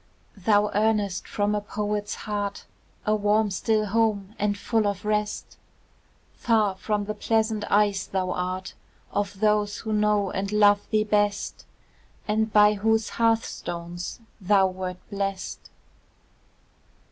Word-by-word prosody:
Thou 205 +1 +2
earnest 205 -3 +1
from 205 0 0
a 210 - 0
poet's 210 0 -3
heart, 205 -1 -3 0.4
A 215 - +2
warm, 210 0 +2
still 215 +3 +1
home, 210 -2 0
and 205 0 0
full 220 0 +1
of 200 +1 -3
rest; 210 0 -2 0.8
Far 220 -4 +2
from 205 +2 -2
the 215 - -3
pleasant 220 -1 0
eyes 205 -1 +2
thou 185 -1 -1
art 185 +1 -3 0.4
Of 200 -1 -3
those 210 -1 +2
who 220 -1 -3
know 210 -2 +2
and 195 +1 -3
love 205 -1 +4
thee 215 -1 +2
best, 205 -1 0 0.6
And 220 +1 +1
by 210 0 +6
whose 220 +2 +1
hearthstones 175 -6 -2 0.2
thou 195 0 +4
wert 185 -1 -4
blest. 195 -1 -4
210 Hz, 125 wpm, -25 LUFS, 200-215 Hz, 0.8 s, by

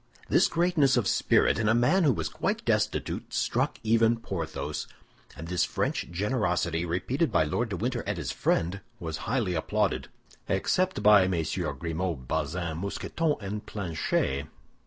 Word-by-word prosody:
This - - +5
greatness 165 -6 +2
of - - +1
spirit - - +3
in 110 -1 +2
a 110 - +4
man 160 +10 +3
who 145 - +5
was 115 - -2
quite - - -2
destitute - - -1
struck - - 0
even 115 +1 +3
Porthos; 90 -8 -4 0.5
and 80 - -7
this 90 0 +1
French - - -1
generosity, 90 -4 0
repeated 95 - 0
by 90 - +4
Lord 115 +10 -1
de 100 - -3
Winter 120 +4 -1
and 105 -2 -1
his 85 - -3
friend, 90 +4 0 0.2
was 80 -2 -4
highly 115 -7 +1
applauded, 80 - 0 0.4
except 185 - +1
by 105 -3 +7
MM. 85 -4 -2
Grimaud, 80 -3 -3
Bazin, 80 +2 -2
Mousqueton 150 - -1
and 105 +1 -4
Planchet. 80 -7 -1
95 Hz, 150 wpm, -28 LUFS, 85-115 Hz, 0.5 s, by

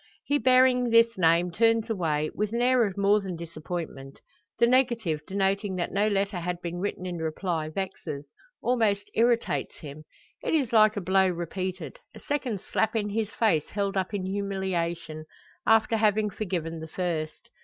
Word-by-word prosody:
He 290 0 +1
bearing 255 0 +4
this 230 0 +5
name 170 0 +3
turns 225 +3 +2
away, 155 -8 -1
with 210 +1 -2
an 235 - 0
air 250 -1 +4
of 195 -1 -7
more 200 +1 +3
than 190 -3 -5
disappointment. 160 -4 -7 0.4
The 235 - +5
negative 235 - +2
denoting 195 0 0
that 175 -1 -2
no 205 +2 +2
letter 200 -2 0
had 175 0 -3
been 175 0 -5
written 185 -1 -3
in 180 -1 -4
reply, 160 0 -2
vexes 155 -5 -5 0.4
almost 215 -5 +1
irritates 235 +1 +1
him. 155 0 -10 0.4
It - - 0
is 265 -7 0
like 215 -1 +5
a - - -1
blow 190 +1 +3
repeated 185 - -4 0.2
a - - -10
second 255 -9 -2
slap 220 - -1
in 210 -2 0
his 215 0 -1
face 205 -10 +1
held 200 -1 -2
up 190 0 -1
in 200 -3 -3
humiliation 180 -5 -3 0.4
after 225 0 +4
having 210 -1 +2
forgiven 170 -5 -3
the 160 - -7
first. 160 -2 -4
195 Hz, 165 wpm, -27 LUFS, 170-220 Hz, 0.4 s, this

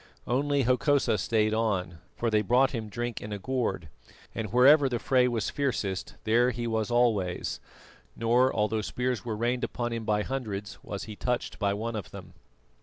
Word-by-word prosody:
Only 140 +3 +1
Hokosa 125 -2 +2
stayed 110 +1 +1
on, 95 -7 -1 0.2
for 115 -1 -1
they 105 -1 +3
brought 125 +6 +3
him 110 -4 -4
drink 120 +1 -4
in 105 - -7
a 105 - -3
gourd, 120 -6 -2 0.5
and 110 -3 -4
wherever 135 +4 +6
the 120 - -1
fray 125 +1 +3
was 115 -4 -1
fiercest 105 -9 -2
there 120 +3 +3
he 120 -1 -3
was 110 -1 -1
always; 115 -7 +1 0.6
nor 120 +3 +3
although 110 0 0
spears 125 +3 -2
were 110 -3 -3
rained 120 +2 0
upon 120 -1 -2
him 115 -1 -3
by 105 -1 +1
hundreds, 105 -6 -5
was 100 - -6
he 105 -1 -8
touched 125 +3 -2
by 100 -1 +1
one 115 +2 -3
of 105 -5 -5
them. - - -11
115 Hz, 180 wpm, -28 LUFS, 105-125 Hz, 0.6 s, wherever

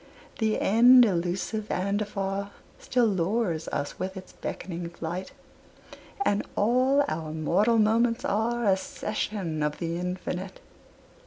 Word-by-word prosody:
The 220 -1 +1
end, 245 +4 +7
elusive 190 +3 -2
and 200 +3 0
afar, 200 -1 -3 0.3
Still 245 -1 +1
lures 190 -3 0
us 145 - -4
with 190 +1 -4
its 185 - -10
beckoning 170 -2 -5
flight, 170 +2 -5 0.9
And 205 0 +2
all 255 +6 +3
our 155 0 -3
mortal 185 +9 +2
moments 230 +2 +2
are 230 +3 0
A 195 -2 +4
session 190 -5 -3
of 150 0 -1
the 170 -1 -3
Infinite. 180 +1 -4
195 Hz, 120 wpm, -27 LUFS, 175-220 Hz, 0.9 s, end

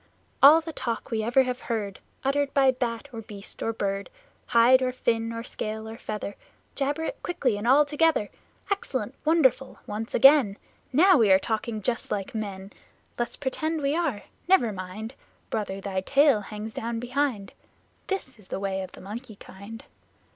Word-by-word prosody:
All 300 +4 +9
the 325 0 -7
talk 235 -5 -4
we 220 -1 0
ever 240 +4 +3
have 250 -1 -3
heard 210 -6 -3 0.2
Uttered 275 +1 +1
by 270 -2 +5
bat 245 0 -3
or 225 - -5
beast 205 -2 -10
or 225 - 0
bird 200 -2 -3 0.4
Hide 240 +3 +6
or 255 -1 +1
fin 230 -2 -1
or 230 0 -5
scale 220 -1 -5
or 220 - -7
feather 210 -1 -5 0.4
Jabber 290 +3 -1
it - - -4
quickly 265 -10 0
and 205 +3 -4
all 285 +4 +6
together! 295 -6 +1 0.4
Excellent! 400 - -2
Wonderful! 280 -5 +2
Once 215 +2 -4
again! 265 -6 +6 0.3
Now 350 +4 +6
we 215 -4 +5
are 190 - +8
talking 220 +1 -3
just 235 +2 -1
like 195 -2 -3
men! 200 -3 -5 0.5
Let's 240 - -2
pretend 310 +3 -2
we 280 +2 +1
are... 310 -12 -1 0.2
never 250 - +4
mind, 195 +5 -7 0.4
Brother, 200 -3 -2
thy 195 -1 -3
tail 275 +1 +4
hangs 210 +2 -7
down 230 0 -3
behind! 245 -4 -2 0.5
This 320 - -4
is 200 - -18
the - - -4
way 195 -1 -2
of 185 -1 -8
the - - -12
Monkey 220 +4 -8
kind. 200 +5 -11
230 Hz, 170 wpm, -26 LUFS, 210-275 Hz, 0.5 s, All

